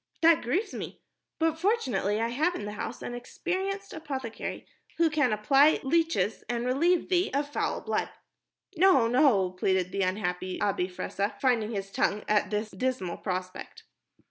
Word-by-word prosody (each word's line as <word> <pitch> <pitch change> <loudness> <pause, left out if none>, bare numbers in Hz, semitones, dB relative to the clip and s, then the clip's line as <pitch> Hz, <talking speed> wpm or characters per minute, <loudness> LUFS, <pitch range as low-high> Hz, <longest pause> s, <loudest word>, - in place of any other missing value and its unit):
"That 330 -1 +6
grieves 365 - -1
me. - - -6 0.4
But, 320 0 0
fortunately, 275 - +1
I 230 +1 0
have 315 +9 +1
in 205 - -5
the 210 - -4
house 210 - -6
an - - -5
experienced 380 +10 -4
apothecary 265 -7 -5 0.3
who 335 -1 +3
can 295 -5 +2
apply 270 +8 +4
leeches 275 - +1
and 240 0 -1
relieve 330 +8 +2
thee 365 0 +2
of 290 +1 -1
foul - - -1
blood." - - -1 0.7
"No, 345 -9 +5
no," 230 -7 +3
pleaded 185 0 0
the 195 +1 -1
unhappy 185 -1 -2
Abi 195 -3 0
Fressah, 200 +3 -3
finding 240 -5 +2
his 195 -3 -4
tongue 205 +1 0
at 210 -2 +2
this 210 +1 -2
dismal 190 -5 -2
prospect. 185 -1 -5
245 Hz, 155 wpm, -28 LUFS, 200-320 Hz, 0.7 s, That